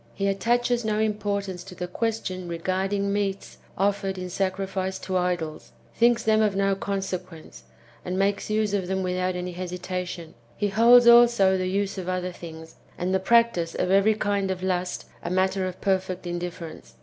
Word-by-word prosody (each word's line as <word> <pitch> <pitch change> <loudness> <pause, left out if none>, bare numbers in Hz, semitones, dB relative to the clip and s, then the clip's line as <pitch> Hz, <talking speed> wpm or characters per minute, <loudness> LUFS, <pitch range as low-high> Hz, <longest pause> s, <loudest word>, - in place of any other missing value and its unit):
He 195 - -2
attaches 240 +4 +1
no 215 -1 0
importance 200 -4 -1
to 185 -1 -11
[the 180 0 -4
question 185 -3 -3
regarding] 190 +4 -1
meats 200 -1 -3 0.2
offered 195 0 0
in 180 -1 -5
sacrifice 190 0 -2
to 185 - -5
idols, 175 -4 -2 0.2
thinks 235 0 +3
them 220 0 +3
of 210 -2 +2
no 195 0 +2
consequence, 190 -4 -5 0.4
and 180 +1 -3
makes 200 +2 0
use 215 -1 0
of 190 -3 -1
them 190 0 -1
without 185 0 -1
any 180 0 -4
hesitation; 180 -1 -5 0.2
he 205 - 0
holds 235 +4 +6
also 235 -5 +6
the 185 -1 -1
use 195 0 -1
of 185 -1 -5
other 185 0 -2
things, 160 -2 -11 0.2
and 180 +2 -1
the 190 - +3
practice 210 -5 +2
of 180 - 0
every 200 +3 +4
kind 200 -2 0
of 185 -1 -3
lust, 180 -1 -2 0.2
a - - -4
matter 190 +1 +1
of 185 0 -7
perfect 190 -1 -1
indifference. 175 -2 -6
190 Hz, 170 wpm, -25 LUFS, 180-205 Hz, 0.4 s, holds